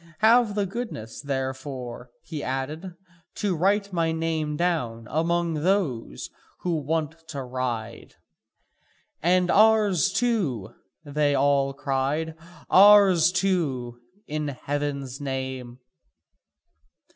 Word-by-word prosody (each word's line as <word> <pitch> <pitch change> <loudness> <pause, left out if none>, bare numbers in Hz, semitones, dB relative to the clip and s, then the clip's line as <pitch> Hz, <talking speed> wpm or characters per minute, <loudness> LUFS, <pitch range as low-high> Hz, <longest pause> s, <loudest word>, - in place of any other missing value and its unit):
Have 225 -1 +5
the 205 -1 +1
goodness, 195 - -6
therefore," 130 -3 -5
he 155 -4 -6
added, 150 +8 -4 0.4
"to 200 -4 -1
write 200 +3 +1
my 165 -2 +1
name 160 -2 -2
down 125 -10 -1
among 170 +1 +1
those 155 - -1 0.3
who 175 -2 0
want 160 +2 -3
to 140 -2 -5
ride." 125 -3 -4 1.1
"And 180 +2 +3
ours 210 -4 +4
too," 195 - -1 0.3
they 145 0 +1
all 140 0 +2
cried, 140 +3 -1 0.3
"ours 195 -4 +7
too, 155 -11 -1 0.3
in 150 0 -3
heaven's 140 -1 -4
name!" 130 -3 -4
155 Hz, 100 wpm, -25 LUFS, 135-180 Hz, 1.1 s, ours